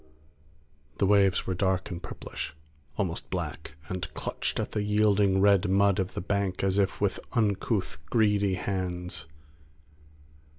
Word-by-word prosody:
The - - +2
waves 100 -2 +4
were 95 - -1
dark 95 +1 0
and 85 -1 -5
purplish, - - -6 0.4
almost 90 -4 -2
black, 80 -3 -5
and 90 -4 -4
clutched - - -2
at - - -2
the 105 - -1
yielding 105 -2 +3
red 100 -1 +4
mud 100 0 +3
of 95 -1 -2
the - - -2
bank 100 0 -1
as 95 +1 +2
if 100 -1 +1
with 100 -2 0
uncouth, 105 - 0
greedy 105 -4 +3
hands. 90 -2 -3
95 Hz, 135 wpm, -28 LUFS, 90-100 Hz, 0.4 s, waves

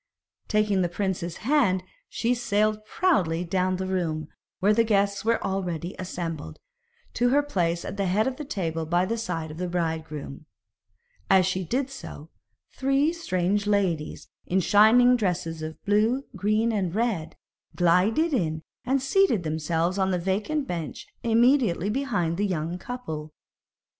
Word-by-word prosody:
Taking 210 -3 +2
the 175 - +1
prince's 175 -2 -3
hand, 240 -10 +3 0.3
she 240 +1 0
sailed 215 -2 0
proudly 185 - +1
down 185 +1 0
the 190 +1 -3
room, 165 -5 -2 0.3
where 205 +3 +4
the 230 - +4
guests 200 -2 +1
were 230 +1 +2
already 180 -3 -3
assembled, 170 -4 -5 0.6
to 245 0 +2
her 285 +3 +3
place 175 -11 -1
at - - -6
the 195 -1 0
head 205 +4 +2
of 265 -1 -2
the 300 - -5
table 165 - -3
by 175 +2 +2
the 230 - -1
side 165 -7 -3
of 155 - -9
the 180 - -2
bridegroom. 160 -4 -4 0.8
As 190 -1 +5
she 185 +1 -1
did 260 - -1
so, 165 - -9 0.4
three 275 +4 +1
strange 205 - -1
ladies 185 -7 0 0.2
in 185 - +2
shining 220 +6 +6
dresses 170 -6 -2
of 155 0 -6
blue, 215 +6 +2
green, 215 +3 +1
and 190 -5 -1
red, 210 -9 -1 0.4
glided 195 - +3
in 160 - -1 0.2
and 265 +1 0
seated 275 - +3
themselves 160 +4 -1
on 190 0 +2
a 180 - +1
vacant 205 - -1
bench 170 -3 -5 0.2
immediately 230 -4 +3
behind 205 -11 -1
the 205 +1 +1
young 170 -1 -3
couple. 160 -10 -6
190 Hz, 150 wpm, -26 LUFS, 170-230 Hz, 0.8 s, shining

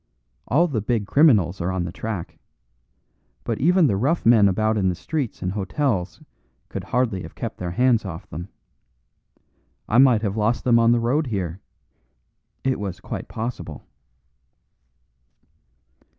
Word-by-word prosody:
All 165 +8 +3
the 125 -9 -2
big 110 -1 -1
criminals 100 - +3
are 90 +2 -1
on 95 -1 -1
the 85 - -4
track; 105 -3 -6 1.0
but - - -3
even 175 +4 +4
the 105 - +2
rough 140 - 0
men 115 -3 +6
about 110 +3 +1
in 95 -3 +1
the 90 - -1
streets 140 - -4
and 90 - -1
hotels 100 -1 -2 0.5
could - - -6
hardly 115 -7 0
have - - -10
kept - - -6
their 90 - -3
hands 120 +5 +2
off 95 -1 -7
them. 85 +4 -7 1.4
I 120 - +3
might 125 -5 +5
have 100 -2 -1
lost 110 +2 0
them 120 -2 +4
on 115 0 +4
the 120 - +3
road 130 +6 0
here. 95 -5 -3 1.0
It 130 -1 0
was 95 -3 -5
quite - - -6
possible." 100 - -6
110 Hz, 150 wpm, -23 LUFS, 95-125 Hz, 1.4 s, men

